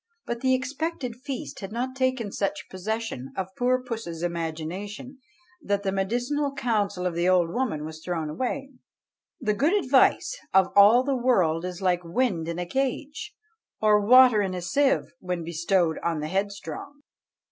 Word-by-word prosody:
But 235 Hz, 0 st, -4 dB
the 260 Hz, -1 st, +3 dB
expected 265 Hz, -1 st, -3 dB
feast 260 Hz, +1 st, -6 dB
had 205 Hz, +2 st, -7 dB, 0.2 s
taken 260 Hz, -5 st, 0 dB
such 200 Hz, 0 st, -2 dB
possession 195 Hz, -, -4 dB
of 190 Hz, 0 st, -4 dB
poor 250 Hz, +1 st, +1 dB
puss's 220 Hz, -9 st, -5 dB
imagination, 175 Hz, -, -4 dB, 0.4 s
that 200 Hz, -5 st, -1 dB
the 195 Hz, -, 0 dB
medicinal 245 Hz, +9 st, -1 dB
counsel 215 Hz, -8 st, -1 dB
of 180 Hz, -, 0 dB
the 170 Hz, +2 st, +1 dB
old 175 Hz, -2 st, +3 dB
woman 215 Hz, -11 st, -2 dB
was 160 Hz, 0 st, -9 dB
thrown 165 Hz, -3 st, -2 dB
away. 260 Hz, -, -3 dB, 0.7 s
"The 215 Hz, -5 st, 0 dB
good 290 Hz, -, +2 dB
advice 365 Hz, -, +3 dB, 0.2 s
of 190 Hz, -1 st, +5 dB
all 210 Hz, +5 st, +7 dB
the 275 Hz, 0 st, 0 dB
world 185 Hz, -10 st, +2 dB
is 180 Hz, +1 st, -6 dB
like 180 Hz, -1 st, +2 dB
wind 175 Hz, -2 st, 0 dB
in 170 Hz, 0 st, -3 dB
a 175 Hz, -, -2 dB
cage, 270 Hz, -, -3 dB, 0.4 s
Or 210 Hz, -1 st, +4 dB
water 250 Hz, -1 st, +7 dB
in 190 Hz, -2 st, -2 dB
a 180 Hz, -, -4 dB
sieve, 270 Hz, +10 st, +1 dB
when 180 Hz, -2 st, -3 dB
bestowed 170 Hz, 0 st, +1 dB
on 165 Hz, -2 st, 0 dB
the 150 Hz, +1 st, -4 dB
headstrong." 200 Hz, -, -4 dB
205 Hz, 160 wpm, -26 LUFS, 175-255 Hz, 0.7 s, all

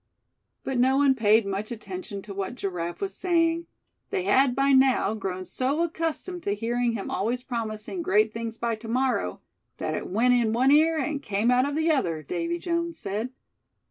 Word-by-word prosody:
But 265 Hz, -2 st, -2 dB
no 260 Hz, +2 st, +4 dB
one 280 Hz, -1 st, +5 dB
paid 220 Hz, -3 st, +4 dB
much 200 Hz, +2 st, -3 dB
attention 235 Hz, -, -6 dB
to 205 Hz, -, -8 dB
what 195 Hz, +4 st, -4 dB
Giraffe 175 Hz, -6 st, -4 dB
was 395 Hz, -1 st, -2 dB
saying; 335 Hz, -2 st, +1 dB, 0.4 s
they 185 Hz, -, -1 dB
had 250 Hz, +6 st, +3 dB
by 275 Hz, 0 st, +3 dB
now 260 Hz, -6 st, +4 dB
grown 185 Hz, -3 st, -4 dB
so 275 Hz, -, 0 dB
accustomed 335 Hz, +2 st, -3 dB
to 200 Hz, -7 st, -1 dB
hearing 235 Hz, +2 st, 0 dB
him 210 Hz, -4 st, -4 dB
always 240 Hz, +5 st, -1 dB
promising 230 Hz, -, -4 dB
great 215 Hz, -, +2 dB
things 230 Hz, 0 st, -5 dB
by 235 Hz, 0 st, -1 dB
"to 225 Hz, +1 st, -10 dB
morrow" 245 Hz, -, 0 dB, 0.4 s
that 155 Hz, -, -2 dB
it -, -, -3 dB
"went 235 Hz, +6 st, +3 dB
in 235 Hz, -3 st, +2 dB
one 255 Hz, +4 st, +4 dB
ear, 320 Hz, +2 st, +5 dB
and 285 Hz, 0 st, -2 dB
came 210 Hz, +1 st, +1 dB
out 255 Hz, +3 st, +3 dB
of 290 Hz, -, -4 dB
the 320 Hz, +1 st, +2 dB
other," 170 Hz, -, 0 dB
Davy 335 Hz, -, -2 dB
Jones 335 Hz, -1 st, -2 dB
said. 210 Hz, +5 st, -3 dB
245 Hz, 185 wpm, -26 LUFS, 210-290 Hz, 0.4 s, one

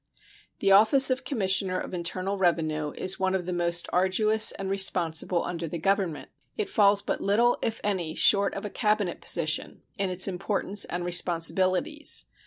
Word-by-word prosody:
The 195 Hz, -, +2 dB
office 225 Hz, +7 st, +6 dB
of 260 Hz, +1 st, -2 dB
Commissioner 190 Hz, -7 st, 0 dB
of -, -, -8 dB
Internal 185 Hz, +3 st, -3 dB
Revenue 160 Hz, -5 st, -1 dB
is 190 Hz, +1 st, -3 dB
one 190 Hz, 0 st, 0 dB
of 180 Hz, -2 st, -3 dB
the 180 Hz, -, -4 dB
most 170 Hz, 0 st, 0 dB
arduous 215 Hz, +4 st, +3 dB
and 195 Hz, -, -7 dB
responsible 180 Hz, -3 st, 0 dB
under 170 Hz, -1 st, -5 dB
the 170 Hz, -, -5 dB
Government. 190 Hz, -2 st, -2 dB, 0.3 s
It 425 Hz, -3 st, -3 dB
falls 200 Hz, -, +3 dB
but -, -, -4 dB
little, 235 Hz, +5 st, +1 dB
if 225 Hz, 0 st, -3 dB
any, 180 Hz, -6 st, -3 dB
short 200 Hz, -1 st, +4 dB
of 200 Hz, -, -6 dB
a 205 Hz, -, -6 dB
Cabinet 210 Hz, -5 st, -1 dB
position 160 Hz, -1 st, 0 dB, 0.2 s
in 195 Hz, -1 st, 0 dB
its 185 Hz, +1 st, +3 dB
importance 195 Hz, +2 st, -1 dB
and 175 Hz, 0 st, -5 dB
responsibilities. 180 Hz, -, 0 dB
190 Hz, 165 wpm, -26 LUFS, 175-205 Hz, 0.3 s, office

